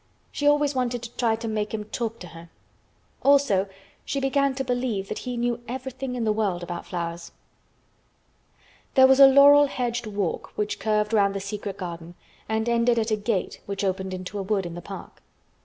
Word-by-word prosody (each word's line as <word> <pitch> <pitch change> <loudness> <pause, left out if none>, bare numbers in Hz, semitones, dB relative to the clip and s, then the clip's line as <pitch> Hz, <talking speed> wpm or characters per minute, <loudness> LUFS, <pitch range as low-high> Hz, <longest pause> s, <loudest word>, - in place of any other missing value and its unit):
She 290 - -1
always 290 0 +3
wanted 245 -2 -1
to 235 - -7
try 230 -2 +1
to 230 +1 -6
make 215 0 -2
him 210 - -4
talk 225 +1 -4
to 180 - -8
her. 165 0 -12 0.7
Also 270 -9 +4 0.4
she 280 - -2
began 275 0 +1
to 270 - -2
believe 245 -6 -2
that - - -4
he 250 -1 -5
knew 240 0 -1
everything 260 +1 -5
in 240 - -2
the 215 - +2
world 200 -5 -1
about 175 0 -6
flowers. 170 -1 -5 1.6
There 260 - +8
was 265 +1 +5
a 275 - +11
laurel 285 +2 +7
hedged 240 -3 -3
walk 200 -5 -3
which 210 0 -2
curved 210 0 0
round 200 -2 +3
the - - -1
secret 200 0 -5
garden 170 -2 -7 0.3
and 220 +1 0
ended 235 0 +2
at 225 0 0
a - - +4
gate 210 -2 -2
which 200 0 -3
opened 190 0 -1
into 185 +2 -5
a - - -1
wood, 195 -1 -1
in 170 - -6
the 175 - -7
park. - - -10
220 Hz, 190 wpm, -25 LUFS, 195-250 Hz, 1.6 s, a